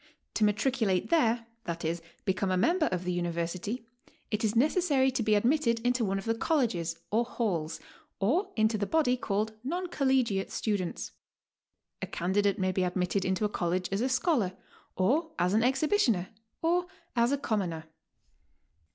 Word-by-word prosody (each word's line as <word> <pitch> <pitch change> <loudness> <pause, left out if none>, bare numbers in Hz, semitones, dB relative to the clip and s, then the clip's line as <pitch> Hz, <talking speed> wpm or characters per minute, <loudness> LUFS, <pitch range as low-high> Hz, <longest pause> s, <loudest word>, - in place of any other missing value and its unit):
To 220 - +1
matriculate 210 - +1
there, 235 -8 +3 0.2
i. 170 -1 -2
e., 165 +1 +1 0.3
become 190 0 0
a 185 - +1
member 325 - +3
of 180 -1 -2
the 180 - -1
University, 175 +6 -2 0.5
it 210 +1 -1
is 215 0 +1
necessary 280 0 +3
to 255 -1 -1
be 215 -1 +3
admitted 235 +1 +2
into 245 0 +1
one 195 -2 0
of 195 - -5
the 225 - +2
Colleges 225 - 0
or 225 +3 +3
Flails, 175 -10 -2 0.4
or 290 - +1
into 220 0 +2
the 200 - -1
body 305 -6 +3
called 215 -2 -1
Non 350 +8 -2
Collegiate 260 - +1
Students; 200 -5 -2 0.9
a - - -3
candidate 200 +4 +1
may 185 -2 +1
be 185 - 0
admitted 180 +1 0
into 190 +3 0
a - - +1
College 180 -1 -1
as 195 +2 0
a 255 - +1
scholar, 255 - +1 0.4
or 295 - +1
as 180 +2 +1
an 220 - +4
exhibitioner, 260 - +2 0.3
or 350 +2 +2 0.3
as 235 +1 +3
a 280 - +2
com 220 -6 0
moner. 165 -4 -3
220 Hz, 165 wpm, -29 LUFS, 185-260 Hz, 0.9 s, an